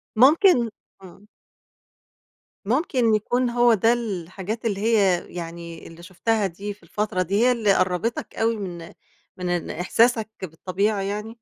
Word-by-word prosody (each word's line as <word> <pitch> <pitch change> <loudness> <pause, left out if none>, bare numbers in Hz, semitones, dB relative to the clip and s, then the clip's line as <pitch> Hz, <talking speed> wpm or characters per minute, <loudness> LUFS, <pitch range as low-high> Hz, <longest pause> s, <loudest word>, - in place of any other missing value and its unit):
ممكن 270 - +5 0.3
إمم. 195 +3 -15 1.4
ممكن 245 - +2
يكون 245 +4 0
هو 240 0 +4
ده 225 +3 +3
الحاجات 205 0 -5
اللي 200 -3 -1
هي 200 -6 +2
يعني 170 -1 -7
اللي 165 +1 -13
شُفتها 200 +4 0
دي 200 +4 -6
في 205 - -26
الفترة 210 -3 -2
دي، 185 +3 -1
هي 250 - +5
اللي 215 -5 +2
قرّبِتك 185 +5 -1
أوي 225 +1 +1
من 175 -5 -7 0.4
من 180 -1 -3
إن 175 -1 -2
إحساسك 220 +5 +2 0.2
بالطبيعة 190 +5 -1
يعني؟ 210 +3 -4
205 Hz, 135 wpm, -23 LUFS, 180-230 Hz, 1.4 s, ممكن